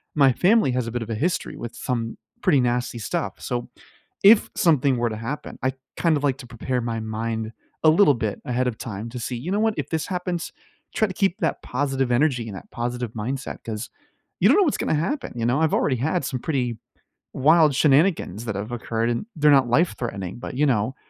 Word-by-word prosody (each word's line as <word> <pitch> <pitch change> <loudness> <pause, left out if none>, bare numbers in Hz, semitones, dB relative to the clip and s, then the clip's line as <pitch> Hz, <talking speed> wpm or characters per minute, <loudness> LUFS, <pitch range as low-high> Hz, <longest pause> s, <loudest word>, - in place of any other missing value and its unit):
my 135 -3 +5
family 195 - +3
has 125 -2 -1
a - - -4
bit 120 0 -2
of 110 - -10
a - - -1
history 170 +10 -1
with 120 0 -6
some 115 -3 -3 0.3
pretty 140 - +4
nasty 120 -1 -1
stuff, 100 -1 -3
so 120 -1 -3 0.5
if 210 +2 +7
something 140 -6 +3
were 120 0 +1
to 110 - -4
happen, 125 +7 -5
I'd 130 0 0 0.2
kind 165 -3 +3
of 145 - -5
like 135 -2 +1
to 125 - -10
prepare 125 +2 -2
my 115 -1 -2
mind 110 0 -3 0.3
a 160 - +7
little 155 -3 +5
bit 110 -4 -3
ahead 125 +1 0
of 115 - -2
time 110 -2 -6
to 125 +1 -6
see, 120 +1 -3
"You 155 +10 -5
know 205 - +1
what? 220 -1 +2
If - - -3
this 160 -2 -2
happens, 180 -2 -3 0.4
try 220 - +3
to 190 - -6
keep 195 -2 +1
that - - -1
positive 135 -1 -1
energy 125 -3 +2
and 100 - -7
that - - -12
positive 120 -1 -3
mindset, 130 +5 -4
'cause 110 +1 -5 0.5
you - - +6
don't - - +6
know 410 - +6
what's 305 - +1
gonna - - 0
happen, 265 - -2
you 115 - -2
know?" 125 +5 +2
I've 160 - +2
already 130 - +2
had 155 +5 0
some 135 -3 -3
pretty 125 -5 -1 0.6
wild 155 +1 +4
shenanigans 140 - +2
that 110 -4 -3
have 105 +4 -4
occurred, 115 -1 -1
and 120 - -2
they're 150 -1 +4
not 135 -3 +5
life 165 +9 +2
threatening, 95 -5 -4
but, 125 - -7
you 150 - +2
know, 125 -1 +1
125 Hz, 220 wpm, -24 LUFS, 115-150 Hz, 0.6 s, if